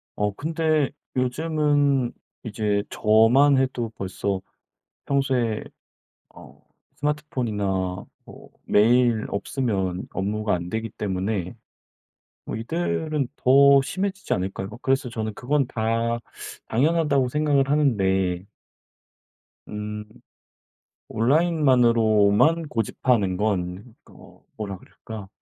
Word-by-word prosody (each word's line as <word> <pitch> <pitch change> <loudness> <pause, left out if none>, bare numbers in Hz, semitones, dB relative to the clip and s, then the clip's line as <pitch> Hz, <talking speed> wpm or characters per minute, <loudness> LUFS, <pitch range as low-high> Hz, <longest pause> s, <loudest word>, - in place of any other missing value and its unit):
어 105 -1 -1
근데 155 +2 0 0.3
요즘은 145 -1 +1 0.3
이제 105 -2 -1
저만 115 +7 +4
해도 130 -3 -1
벌써 95 0 -3 0.6
평소에 130 -5 0 0.7
어 - - -16 0.4
스마트폰이나 105 -11 -2 0.2
뭐 - - -14
메일 115 +1 +3
없으면 100 -5 -2
업무가 105 +2 -1
안 85 0 -4
되기 110 +4 -3
때문에 95 -2 -3 0.9
뭐 - - -5
이들은 155 +2 -2
더 140 +1 +6
심해지지 195 +7 -3
않을까요? 95 +1 -3
그래서 135 0 +1
저는 110 -2 -4
그건 140 +1 0
다 115 -1 -1 0.5
당연하다고 140 0 +2
생각을 145 -1 +1
하는데 95 -11 +1 1.2
음 105 0 -6 1.0
온라인만으로만 125 -1 +3
고집하는 115 -5 0
건 100 +2 -2 0.2
어 - - -17
뭐라 100 -3 -5
그럴까 105 +1 -10
115 Hz, 210 characters per minute, -24 LUFS, 105-140 Hz, 1.2 s, 더